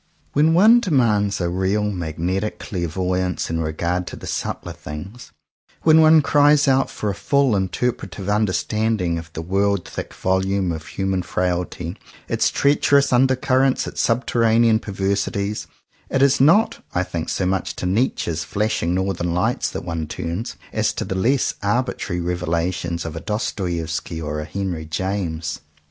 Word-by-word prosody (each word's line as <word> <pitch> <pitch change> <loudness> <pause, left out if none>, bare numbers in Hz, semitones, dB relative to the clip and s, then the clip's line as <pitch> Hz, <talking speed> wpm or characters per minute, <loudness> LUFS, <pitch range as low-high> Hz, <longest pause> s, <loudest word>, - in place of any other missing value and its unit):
When 155 +3 +4
one 220 +7 +7
demands 115 - +2
a 90 - 0
real 95 +4 0
magnetic 95 +1 -2
clairvoyance 90 -2 -2
in 80 - -1
regard 85 +3 -2
to - - -6
the - - -10
subtler - - -4
things, 95 - -9 0.5
when 160 0 +6
one 155 -1 +6
cries 145 +1 +4
out 135 0 +3
for 105 - -3
a - - -3
full 140 +3 +2
interpretive 95 -1 -2
understanding 105 -3 0
of 80 0 -11
the 80 - -5
world 100 +1 0
thick - - -7
volume 95 0 0
of 80 -1 -6
human 95 -1 -1
fatality, 90 0 -2 0.3
its - - +1
treacherous 140 -1 +3
under 130 +1 +4
currents, 130 0 +2
its - - -3
subterranean 115 -1 +3
perversities, 100 +1 -2 0.4
it 135 - +2
is 135 -1 +4
not, 195 +11 +4
I 90 - +2
think 85 -3 -4
so 95 - -1
much 95 0 -1
to - - -5
Nietzsche's 90 - 0
flashing 100 -1 -1
northern 90 -2 -1
lights 90 - 0
that - - -6
one 85 -2 -3
turns, 85 +9 -4 0.2
as - - +1
to - - -3
the - - -3
less 120 +8 +1
arbitrary 100 -4 -1
revelations 85 0 -2
of 80 -1 -5
a - - -4
Dostoevsky 85 -5 -3
or 75 -1 -3
a 75 - -4
Henry 85 -1 -4
James. 85 -2 -3
95 Hz, 150 wpm, -21 LUFS, 85-115 Hz, 0.5 s, one